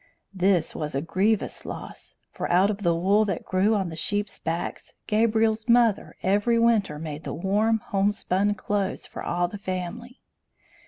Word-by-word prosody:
This 185 Hz, -3 st, +2 dB
was 150 Hz, -2 st, -4 dB
a 135 Hz, -, 0 dB
grievous 200 Hz, +6 st, 0 dB
loss, -, -, -8 dB, 0.2 s
for -, -, -4 dB
out 185 Hz, +4 st, +4 dB
of 205 Hz, -, -5 dB
the 170 Hz, -3 st, +2 dB
wool 195 Hz, +5 st, +3 dB
that 195 Hz, -5 st, -3 dB
grew 195 Hz, +4 st, +2 dB
on 190 Hz, -4 st, -1 dB
the 160 Hz, -, -7 dB
sheeps' 205 Hz, +6 st, -2 dB
backs, 165 Hz, +2 st, -4 dB
Gabriel's 220 Hz, +1 st, +1 dB
mother 235 Hz, -3 st, +3 dB
every 205 Hz, +5 st, +2 dB
winter 225 Hz, -9 st, +2 dB
made 150 Hz, -1 st, -6 dB
the -, -, -5 dB
warm, 210 Hz, +6 st, +1 dB
homespun 205 Hz, -1 st, 0 dB
clothes 200 Hz, -1 st, -2 dB
for -, -, -8 dB
all 175 Hz, 0 st, 0 dB
the 200 Hz, +3 st, -8 dB
family. 190 Hz, +7 st, -5 dB
200 Hz, 160 wpm, -25 LUFS, 175-215 Hz, 0.2 s, out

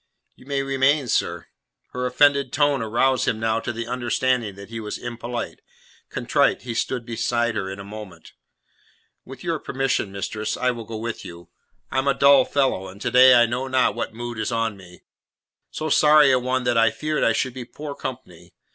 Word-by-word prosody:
"You 130 Hz, -, -19 dB
may 140 Hz, -1 st, -1 dB
remain, 135 Hz, +1 st, +2 dB
sir." -, -, -1 dB, 0.5 s
Her 125 Hz, 0 st, -2 dB
offended 140 Hz, +1 st, +3 dB
tone 145 Hz, -2 st, +2 dB
aroused 120 Hz, +4 st, +1 dB
him 110 Hz, -, 0 dB
now 110 Hz, 0 st, 0 dB
to 115 Hz, -, -4 dB
the 115 Hz, 0 st, -5 dB
understanding 120 Hz, -2 st, -1 dB
that 100 Hz, +1 st, -11 dB
he 115 Hz, -, -5 dB
was 105 Hz, -1 st, -5 dB
impolite. 120 Hz, 0 st, -5 dB, 0.5 s
Contrite -, -, +1 dB
he 120 Hz, -2 st, -4 dB
stood 120 Hz, +1 st, -2 dB
beside 120 Hz, 0 st, -1 dB
her 100 Hz, -3 st, -3 dB
in 95 Hz, -, -6 dB
a -, -, -7 dB
moment. 105 Hz, -1 st, -11 dB, 0.9 s
"With 130 Hz, 0 st, -11 dB
your 165 Hz, -3 st, -1 dB
permission, 135 Hz, -8 st, -1 dB
mistress, 105 Hz, +2 st, -4 dB
I 125 Hz, -, +1 dB
will 115 Hz, -2 st, -7 dB
go 110 Hz, 0 st, -6 dB
with 115 Hz, +1 st, -5 dB
you. 85 Hz, 0 st, -11 dB, 0.4 s
I 130 Hz, -, +1 dB
am 135 Hz, -, -1 dB
a 140 Hz, -, +3 dB
dull 140 Hz, -2 st, +6 dB
fellow, 130 Hz, -9 st, 0 dB
and 95 Hz, +2 st, -12 dB
to -, -, -2 dB
day 125 Hz, 0 st, +8 dB
I 120 Hz, -, +6 dB
know 125 Hz, +3 st, -3 dB
not 130 Hz, -5 st, +2 dB
what 115 Hz, -, -4 dB
mood 120 Hz, 0 st, -6 dB
is 110 Hz, -, -2 dB
on 115 Hz, -2 st, -1 dB
me. 90 Hz, -2 st, -15 dB, 0.7 s
So 155 Hz, -, -4 dB
sorry 150 Hz, -1 st, +6 dB
a 130 Hz, -, +4 dB
one 130 Hz, +1 st, -1 dB
that 120 Hz, -2 st, +2 dB
I 115 Hz, 0 st, +5 dB
feared 155 Hz, +7 st, -2 dB
I 115 Hz, -, +3 dB
should 130 Hz, +3 st, -1 dB
be 130 Hz, -1 st, -6 dB
poor 145 Hz, +4 st, -8 dB
company. 90 Hz, -12 st, -8 dB
120 Hz, 200 wpm, -23 LUFS, 110-130 Hz, 0.9 s, day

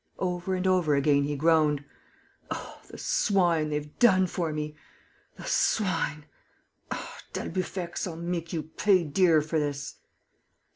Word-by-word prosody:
Over 180 Hz, 0 st, -1 dB
and 185 Hz, 0 st, -2 dB
over 180 Hz, -6 st, +3 dB
again, 140 Hz, 0 st, +3 dB
he 145 Hz, 0 st, -2 dB
groaned: 150 Hz, -1 st, +3 dB, 0.6 s
"Oh, -, -, -6 dB
the -, -, -10 dB
swine, 175 Hz, -6 st, +2 dB
they've 150 Hz, 0 st, -4 dB
done 190 Hz, -6 st, +6 dB
for 170 Hz, -2 st, -2 dB
me!... 150 Hz, 0 st, -4 dB, 0.6 s
The -, -, -10 dB
swine!... 165 Hz, -7 st, +1 dB, 0.6 s
Ah, -, -, -6 dB
d'Albufex, 185 Hz, -1 st, -3 dB
I'll 170 Hz, -, -5 dB
make 170 Hz, 0 st, -3 dB
you 160 Hz, -3 st, -2 dB
pay 185 Hz, +4 st, +2 dB
dear 160 Hz, 0 st, +3 dB
for 155 Hz, +1 st, 0 dB
this!..." 145 Hz, -1 st, -3 dB
165 Hz, 135 wpm, -28 LUFS, 150-185 Hz, 0.6 s, done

